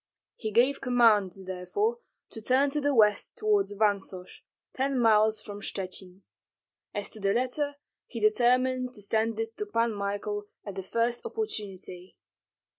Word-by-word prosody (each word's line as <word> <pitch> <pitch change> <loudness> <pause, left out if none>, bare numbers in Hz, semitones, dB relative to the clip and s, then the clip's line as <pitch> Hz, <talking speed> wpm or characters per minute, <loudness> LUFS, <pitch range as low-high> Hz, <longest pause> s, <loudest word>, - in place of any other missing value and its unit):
He 220 - -4
gave 250 +6 +3
command, 225 -7 +4
therefore, 190 - -1 0.3
to 225 - -7
turn 265 +5 +3
to 295 +1 0
the 285 -1 +1
west 210 - +3
toward 425 -2 +2
Vansosh, 200 -3 -2 0.3
ten 270 +1 0
miles 220 -2 +4
from 205 0 -8
Shchuchyn. 190 -1 -6 0.7
As 205 -1 -2
to 220 - -7
the 195 -1 +1
letter 285 +4 0 0.3
he 235 - -6
determined 250 +3 +2
to 210 - -9
send 220 +2 0
it 225 0 -3
to 210 - -3
Pan 230 +1 +1
Michael 205 +1 -3 0.2
at 200 - -5
the 190 - -4
first 230 +5 -1
opportunity. 195 - -5
220 Hz, 145 wpm, -28 LUFS, 205-255 Hz, 0.7 s, command